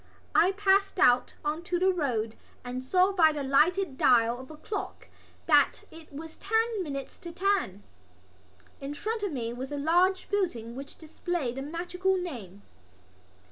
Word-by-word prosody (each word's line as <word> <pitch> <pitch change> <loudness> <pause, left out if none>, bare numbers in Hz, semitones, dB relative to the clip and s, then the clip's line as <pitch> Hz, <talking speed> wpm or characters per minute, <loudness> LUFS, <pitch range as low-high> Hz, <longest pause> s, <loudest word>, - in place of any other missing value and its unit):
I 370 +3 +4
passed 395 0 +2
out 250 -9 +4
on 305 +2 -1
to 355 0 0
the 375 +2 +3
road 235 -10 -1 0.3
and 250 +1 -5
saw 365 +8 +3
by 330 -5 +5
the 295 -2 -4
lighted 300 +3 +2
dial 235 0 +4
of 260 - -11
a 310 - -10
clock 405 +6 -6 0.4
that - - +3
it 320 -1 -14
was 315 +3 -9
ten 445 +1 0
minutes 275 -5 -6
to 340 - -8
ten. 360 - 0 1.0
In 280 +1 -6
front 440 +7 -3
of 405 -3 -2
me 235 -4 -3
was 260 +3 -6
a 290 - -3
large 355 +6 +2
building 290 - -2
which 275 +2 -9
displayed 320 -4 -3
the - - -3
magical 355 +5 -1
name. 220 - -7
320 Hz, 160 wpm, -28 LUFS, 260-375 Hz, 1.0 s, by